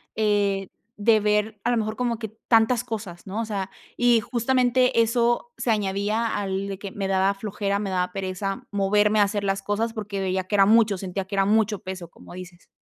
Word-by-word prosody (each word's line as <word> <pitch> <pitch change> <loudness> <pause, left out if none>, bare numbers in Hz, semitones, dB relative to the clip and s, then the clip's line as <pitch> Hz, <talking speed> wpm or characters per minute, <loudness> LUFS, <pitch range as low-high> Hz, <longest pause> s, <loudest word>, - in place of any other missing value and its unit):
eh, 205 -2 +1 0.3
de 215 +1 +3
ver 210 0 0
a 240 - +1
lo 240 - +2
mejor 215 0 -2
como 235 -2 -1
que 220 - -5 0.2
tantas 230 +1 +4
cosas, 200 -6 -7
¿no?, 195 +3 -4
o 230 - -3
sea, 195 -3 -4 0.3
y 240 -1 +4
justamente 250 +1 +2
eso 235 - +1
se 235 - 0
añadía 210 +2 0
al 195 -1 -2
de 195 -1 -5
que 200 0 -7
me 195 -1 -3
daba 195 +1 +2
flojera, 200 0 -2
me 205 -1 -3
daba 180 -1 -1
pereza 195 0 -4
moverme 205 +1 +2
a - - +7
hacer 205 0 -1
las 195 0 -1
cosas, 205 +3 -1
porque 210 -3 -5
veía 190 0 -1
que 185 - -10
era 195 -1 +5
mucho, 215 -2 +4
sentía 190 0 -4
que 200 - -12
era 195 0 +3
mucho 215 -1 +2
peso, 185 -2 -7
como - - -14
dices. 180 -1 -11
205 Hz, 205 wpm, -24 LUFS, 195-225 Hz, 0.3 s, a